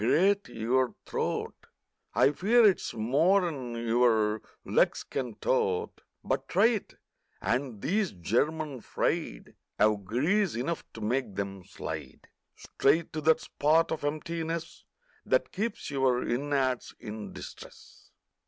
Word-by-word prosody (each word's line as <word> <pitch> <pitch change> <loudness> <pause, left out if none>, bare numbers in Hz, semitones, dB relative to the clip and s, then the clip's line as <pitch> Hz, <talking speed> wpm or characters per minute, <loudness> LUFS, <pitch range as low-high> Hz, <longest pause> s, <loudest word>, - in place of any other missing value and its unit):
Grate 195 - +3
your 125 +3 0
throat! - - -2 0.6
I 140 - +5
fear 225 +9 +4
it's 200 -3 +3
more'n 140 - +1
your 115 -2 +2 0.2
legs - - +2
can 125 -5 -4
tote, 95 -8 0 0.2
But - - -1
try 200 +6 +4
it. 220 -5 -3 0.4
And 125 -4 -1
these 200 +3 +1
"German 135 - -1
fried" - - -2 0.3
'Ave 105 -1 +4
grease 160 - +1
enough 145 +8 -2
to 110 - -9
make 115 -1 -1
'em 100 -1 -4
slide 95 - -7 0.3
Straight 155 +4 +1
to 155 - -3
that 160 +1 +4
spot 160 +3 +2
of 160 - -3
emptiness 165 +2 -3 0.4
That - - +1
keeps 210 -4 -3
your 130 -3 +1
innards 130 0 0
in 105 0 -7
distress! - - -12
135 Hz, 120 wpm, -29 LUFS, 115-165 Hz, 0.6 s, I